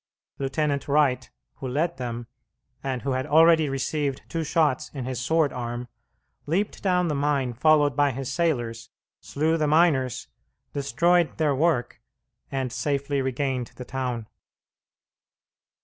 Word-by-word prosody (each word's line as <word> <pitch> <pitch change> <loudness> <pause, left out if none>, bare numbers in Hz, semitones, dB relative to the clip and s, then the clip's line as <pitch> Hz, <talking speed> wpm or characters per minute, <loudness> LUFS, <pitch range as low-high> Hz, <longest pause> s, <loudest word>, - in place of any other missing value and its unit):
Lieutenant 140 +1 -1
Wright, 140 -3 +2 0.3
who 135 - -5
led 155 +6 -1
them, 120 -2 -4 0.6
and 130 -2 -3
who 140 - -1
had 130 +2 -1
already 160 0 +5
received 135 +1 -2
two 165 -1 -2
shots 150 -4 +1
in 130 -3 -4
his 130 -1 -3
sword 155 +3 +1
arm, 120 0 -4 0.6
leaped 195 +7 -1
down 180 -2 +2
the 155 - 0
mine 140 -3 0
followed 145 +3 +3
by 145 -1 +3
his 135 +1 -4
sailors, 120 -10 -1 0.3
slew 160 +3 0
the 155 -2 +1
miners, 145 -6 +2 0.5
destroyed 170 +6 +2
their 155 -3 +2
work, 135 -4 0 0.5
and 130 -3 -2
safely 140 +2 -1
regained 130 -1 -2
the 125 - -8
town. 125 -4 -3
140 Hz, 135 wpm, -25 LUFS, 130-155 Hz, 0.6 s, already